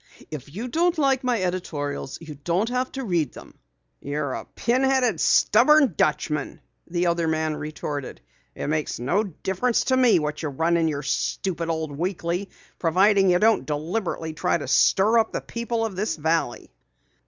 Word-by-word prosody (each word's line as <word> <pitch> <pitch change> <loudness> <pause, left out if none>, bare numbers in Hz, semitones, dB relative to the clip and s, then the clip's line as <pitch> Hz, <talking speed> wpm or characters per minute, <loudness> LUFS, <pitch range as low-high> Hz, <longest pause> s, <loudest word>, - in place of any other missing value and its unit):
If 145 -2 -7
you 215 - -5
don't 335 +6 +1
like 270 -3 +2
my 245 -3 +1
editorials 150 -7 -3
you 160 -2 -9
don't 170 +9 -1
have 255 +1 -1
to 270 - -4
read 170 - 0
them." - - -12 0.5
"You're 145 -1 -3
a - - -5
pin 245 +2 0
headed, 265 -2 +2
stubborn 300 - +5
Dutchman!" 150 0 -1 0.3
the 175 +1 0
other 170 -1 +1
man 155 -1 0
retorted. 150 -2 -5 0.4
"It - - -5
makes 155 -3 -2
no 175 - +1
difference 195 +5 -1
to 260 - +2
me 250 -3 +5
what 150 -1 -2
you 155 - -2
run 165 +5 +1
in 165 -1 +2
your 145 -2 -2
stupid 165 +4 -2
old 160 -3 -2
weekly, 175 +3 -2 0.3
providing 195 +3 +4
you 180 - +4
don't 220 +4 +3
deliberately 160 +2 -3
try 155 - 0
to 145 - -7
stir 205 - +4
up 225 - 0
the - - -1
people 235 -1 -3
of 210 -4 -5
this 210 +4 -1
valley." 160 - -1
175 Hz, 170 wpm, -24 LUFS, 155-225 Hz, 0.5 s, stubborn